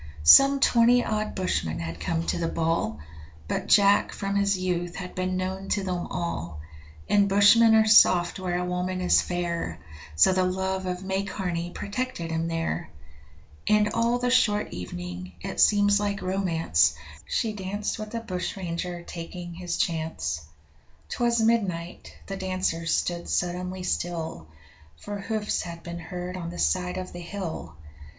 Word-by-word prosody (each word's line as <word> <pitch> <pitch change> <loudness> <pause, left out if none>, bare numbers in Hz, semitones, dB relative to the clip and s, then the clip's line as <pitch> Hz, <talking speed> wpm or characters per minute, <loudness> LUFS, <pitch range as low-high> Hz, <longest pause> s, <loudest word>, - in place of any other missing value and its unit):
Some 275 - +8
twenty 240 -1 +4
odd 215 0 -2
bushmen 180 - -1
had 80 0 -5
come 165 - -2
to - - -1
the 165 - 0
'ball', 165 - -1 0.5
But - - -2
Jack 200 -1 +4
from 200 0 -3
his 200 -1 +2
youth 175 -1 -2
had 180 -1 -6
been 185 0 -2
known 190 +1 -4
to 200 - 0
them 180 -2 -3
all, 85 - -4 0.5
And 200 -1 +3
bushmen 215 +3 +6
are 220 0 +5
soft 185 -4 +5
where 180 -1 -2
a 180 - -2
woman 180 +1 -2
is 180 - +4
fair, 170 - -3 0.4
So 80 - +5
the 185 0 +2
love 190 +1 -1
of 180 +1 -3
May 190 0 -1
Carney 180 -4 -3
protected 205 -3 -4
him 165 0 -1
there; 165 +1 -2 0.8
And 210 0 +3
all 230 +1 +2
the 245 0 0
short 210 -5 +2
evening 90 0 -7
it - - -5
seems 205 -1 +5
like 205 -1 -2
romance 185 -3 +2 0.3
She 225 -2 -1
danced 205 +2 -4
with 215 +1 -6
a 230 - -2
bushranger 180 -3 -4
taking 175 +1 -7
his 175 0 -4
chance. 160 - -2 0.7
'Twas 235 -1 +1
midnight 195 -7 -1
the 195 - -5
dancers 185 -3 -2
stood 170 -1 -2
suddenly 180 +1 -2
still, 165 - -3 0.5
For 205 - -6
hoofs 215 +1 -2
had 170 -1 -8
been 170 0 -6
heard 180 +2 -6
on 170 -2 -5
the 175 - -8
side 180 -1 0
of 185 0 -6
the 175 - -7
hill! 170 - -6
185 Hz, 155 wpm, -26 LUFS, 170-205 Hz, 0.8 s, Some